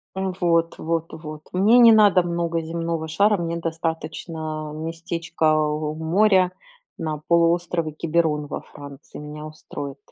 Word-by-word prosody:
Вот 175 -3 0
вот 165 0 -1
вот. 155 -1 -8
Мне 205 +6 +5
не 235 -1 +9
надо 205 -4 +6
много 170 -1 -1
земного 165 0 -3
шара, 200 +6 +3
мне 170 -1 -2
достаточно 160 -1 -4
местечка 165 0 -1
у 150 0 -1
моря, 185 +3 +3 0.5
на 155 -2 -3
полуострове 170 -1 +2
Киберон 155 -1 0
во - - -5
Франции. 140 0 -12
Меня 150 +1 -8
устроит. 145 -2 -8
165 Hz, 125 wpm, -23 LUFS, 155-170 Hz, 0.5 s, не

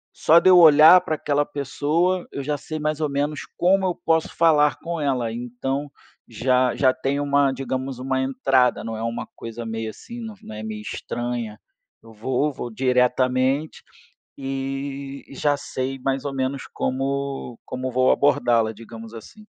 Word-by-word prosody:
Só 165 - +5
de 185 - +5
olhar 165 0 +8
pra 155 - -2
aquela 145 -1 0
pessoa, 150 +6 -1
eu 140 - -5
já 145 +1 -1
sei 155 +2 -6
mais 155 +1 -2
ou 150 - 0
menos 145 +2 -2 0.2
como 190 +2 +3
eu 180 - 0
posso 160 -1 0
falar 150 -3 +4
com 170 -1 -4
ela. 125 -5 0
Então 130 +4 -4 0.4
já 125 +2 +1
já 130 -2 +3
tem 135 +2 -2
uma, 140 -1 +2
digamos, 130 -1 -4
uma 130 0 -1
entrada, 130 -1 +2
não 115 0 -5
é - - -6
uma 115 0 -3
coisa 115 +1 -7
meio 110 0 -4
assim, 235 - -10
não 225 -2 -7
não 110 - -10
é 110 - -7
meio 110 -1 -5
estranha, 120 0 -5 0.4
eu 115 0 -15
vou 130 +7 -1
vou 120 - -6
diretamente 130 +3 +1 0.5
e 135 0 -5
e - - -11
já 145 +1 +1
sei 135 0 -4
mais 135 +1 -2
ou 140 -1 -3
menos 135 +1 -2
como 135 -1 -3
como 130 0 -4
vou 130 +1 +3
abordá-la, 120 -5 +3
digamos 115 +1 -11
assim. 210 - -12
135 Hz, 165 wpm, -23 LUFS, 125-145 Hz, 0.5 s, olhar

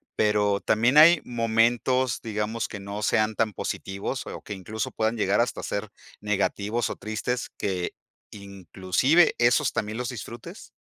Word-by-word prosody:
pero 105 -1 +2
también, 120 +6 +2
¿hay 160 +2 +8
momentos, 120 +2 +1
digamos 110 +1 -2
que 100 - -8
no 100 +2 -6
sean 110 0 +1
tan 110 -1 0
positivos 100 +8 -4
o - - -7
que 105 - -7
incluso 110 +4 -4
puedan 110 +1 -1
llegar 105 -1 +2
hasta 120 - -2
a - - -7
ser 100 +1 -3 0.3
negativos 105 +2 -1
o - - -4
tristes, 110 +3 -4
que 95 -3 -2 0.4
inclusive 100 - +1
esos 120 +4 +3
también 110 +1 -3
los 125 -1 -3
disfrutes? 120 -1 -9
110 Hz, 150 wpm, -25 LUFS, 100-120 Hz, 0.4 s, hay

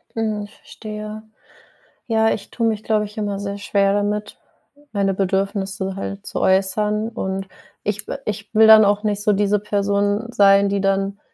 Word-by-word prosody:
Mhm. 215 -2 -1
Ich 205 - -14
verstehe. 215 0 -8 0.8
Ja, 220 -1 +2
ich - - -6
tue 230 - -1
mich, 220 -1 -1
glaube 215 -1 +1
ich, 210 0 -11
immer 205 -2 -2
sehr 200 0 -4
schwer 200 -1 +1
damit, 205 +1 -2 0.6
meine 200 -2 0
Bedürfnisse 195 0 -2
halt 195 0 -6
zu - - -4
äußern. 210 +3 +1
Und 195 -4 -4 0.4
ich 210 +1 -3
w - - -4
ich 210 0 -4
will 220 0 +7
dann 220 -1 +9
auch 205 +1 +1
nicht 205 -1 -1
so 210 0 +2
diese 205 +1 +2
Person 205 +2 0
sein, 200 -2 +5
die 200 0 0
dann 195 +1 0
205 Hz, 170 wpm, -21 LUFS, 195-215 Hz, 0.8 s, dann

